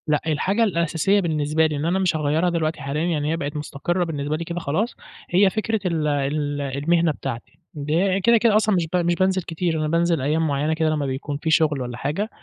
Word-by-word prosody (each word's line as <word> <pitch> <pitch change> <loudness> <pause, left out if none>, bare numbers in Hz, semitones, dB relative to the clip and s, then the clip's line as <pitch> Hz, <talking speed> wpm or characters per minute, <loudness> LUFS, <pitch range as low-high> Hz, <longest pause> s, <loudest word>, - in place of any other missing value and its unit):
لأ، 150 -1 +2
الحاجة 190 +8 +1
الأساسية 170 0 +1
بالنسبة 155 -3 +1
لي 155 -1 -1
إن 145 +2 -2
أنا 180 +3 +1
مش 185 -3 +1
هاغيّرها 155 +3 +1
دلوقتي 160 -2 -1
حاليًا، 140 +3 -2
يعني 155 -3 0
هي 165 - 0
بقت 145 -2 -4
مستقرة 150 +4 -2
بالنسبة 150 -3 -2
لي 170 - -4
كده 170 +1 -4
خلاص، 175 - -1 0.3
هي 190 +2 +4
فكرة 220 +2 -1
ال 165 -4 0
ال 145 0 -1
المهنة 155 +5 +1
بتاعتي، 120 -5 -7
ده 165 +6 0
كده، 235 +2 +5
كده 225 -1 +3
أصلًا 215 -1 +3
مش 170 -3 0
ب - - +2
مش 175 0 +1
بانزل 185 +1 +1
كتير، 165 -1 -2
أنا 155 - 0
بانزل 170 -1 +1
أيام 155 +4 +1
معيّنة 145 +2 0
كده 160 0 +1
لمّا 150 -2 -1
بيكون 140 +2 -3
في 160 +2 -3
شغل 155 -4 +3
والّا 125 -1 -5
حاجة، 155 - -2
160 Hz, 215 wpm, -22 LUFS, 145-175 Hz, 0.3 s, كده